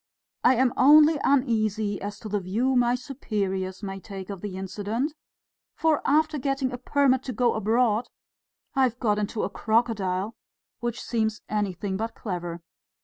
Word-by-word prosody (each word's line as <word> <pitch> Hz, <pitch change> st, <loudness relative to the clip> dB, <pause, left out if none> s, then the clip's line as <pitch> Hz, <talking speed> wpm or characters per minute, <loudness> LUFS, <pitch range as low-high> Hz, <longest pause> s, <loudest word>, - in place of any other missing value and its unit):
I 255 Hz, -, +6 dB
am 255 Hz, +1 st, +2 dB
only 300 Hz, +3 st, +7 dB
uneasy 220 Hz, -6 st, +1 dB
as 205 Hz, 0 st, -5 dB
to 220 Hz, -, -6 dB
the 205 Hz, 0 st, -1 dB
view 225 Hz, +8 st, 0 dB
my 245 Hz, 0 st, +3 dB
superiors 200 Hz, -7 st, -3 dB
may 195 Hz, -1 st, -4 dB
take 195 Hz, 0 st, -8 dB
of 195 Hz, -3 st, -7 dB
the 200 Hz, -3 st, -5 dB
incident; 205 Hz, -, -3 dB, 0.6 s
for 320 Hz, -2 st, +2 dB
after 310 Hz, +1 st, +2 dB
getting 275 Hz, -1 st, -1 dB
a 245 Hz, -, -6 dB
permit 260 Hz, 0 st, +2 dB
to 255 Hz, -, -3 dB
go 240 Hz, +1 st, +2 dB
abroad 220 Hz, +1 st, +1 dB, 0.7 s
I've 260 Hz, -4 st, +2 dB
got 210 Hz, -4 st, +1 dB
into 210 Hz, +1 st, -2 dB
a -, -, -1 dB
crocodile, 215 Hz, -3 st, 0 dB, 0.5 s
which 240 Hz, +1 st, -3 dB
seems 220 Hz, -2 st, -1 dB
anything 200 Hz, -2 st, -2 dB
but 225 Hz, +2 st, -4 dB
clever." 175 Hz, -4 st, -5 dB
220 Hz, 150 wpm, -26 LUFS, 200-255 Hz, 0.7 s, only